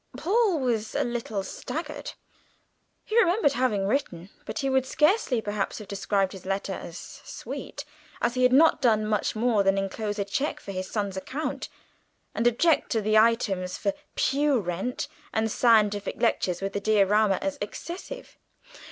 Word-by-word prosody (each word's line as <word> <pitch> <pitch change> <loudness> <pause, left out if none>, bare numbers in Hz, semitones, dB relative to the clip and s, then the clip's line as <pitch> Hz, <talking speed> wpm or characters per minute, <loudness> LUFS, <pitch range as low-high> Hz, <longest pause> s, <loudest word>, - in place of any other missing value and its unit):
Paul 395 -1 +2
was 230 -5 -1
a - - +2
little 230 -4 -3
staggered. - - -6 0.9
He 435 - -4
remembered 365 -7 +3
having 225 -6 +1
written, 195 -6 -2 0.2
but - - -5
he 275 - -1
would 265 -1 +2
scarcely 300 - +2
perhaps 205 -2 -2
have 210 - -9
described 195 -1 0
his 190 -2 -10
letter 195 0 -2
as 175 -2 -7 0.3
"sweet," - - -7 0.3
as 240 - +1
he 255 - -1
had 250 0 +5
not 310 +5 +5
done 215 -4 +3
much 215 0 0
more 225 -1 +2
than 195 0 +2
enclose 205 +2 -2
a 200 - -1
cheque 200 +10 -2
for 200 - -8
his 185 -1 -4
son's 200 -3 -2
account 280 +11 -4 0.6
and 235 - +1
object 295 +7 +3
to 225 - +1
the 215 +1 +1
items 215 -5 +2
for 300 - 0 0.2
pew 280 -1 +2
rent 190 +6 -3 0.3
and 220 0 0
scientific 210 -4 +3
lectures 180 -1 +1
with 195 0 -2
the 200 - -2
diorama 210 -1 +3
as 290 -1 -3
excessive. 360 - -7
220 Hz, 160 wpm, -26 LUFS, 195-265 Hz, 0.9 s, had